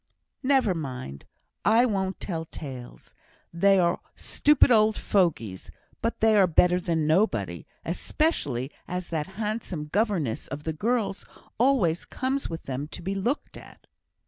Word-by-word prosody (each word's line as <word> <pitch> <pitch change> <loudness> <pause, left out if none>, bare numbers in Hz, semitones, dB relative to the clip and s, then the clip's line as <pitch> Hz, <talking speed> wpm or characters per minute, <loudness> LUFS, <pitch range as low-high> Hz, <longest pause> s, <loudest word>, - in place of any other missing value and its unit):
"Never 260 -7 +3
mind! 130 - -6 0.4
I 225 +4 +5
won't 195 -4 -1
tell 165 -4 -3
tales. 130 -6 -9 0.4
They 195 +3 +4
are 175 0 +2 0.2
stupid 295 -3 +3
old 215 -1 +4
fogeys, 150 - 0 0.3
but 230 - -2
they 220 -1 +5
are 195 -3 +6
better 180 +1 +4
than 165 -3 0
nobody, 185 +8 +1 0.2
especially 140 - -1 0.2
as 180 0 -4
that 160 -2 -2
handsome 210 -8 -3
governess 185 - 0
of 145 +2 -6
the 160 - -2
girls 210 +3 -1 0.4
always 230 -11 +2
comes 265 +2 -2
with 165 -1 -6
them 135 +2 -4
to 155 - -10
be 195 +3 -2
looked 235 +9 -2
at." - - -15
185 Hz, 140 wpm, -26 LUFS, 155-220 Hz, 0.4 s, are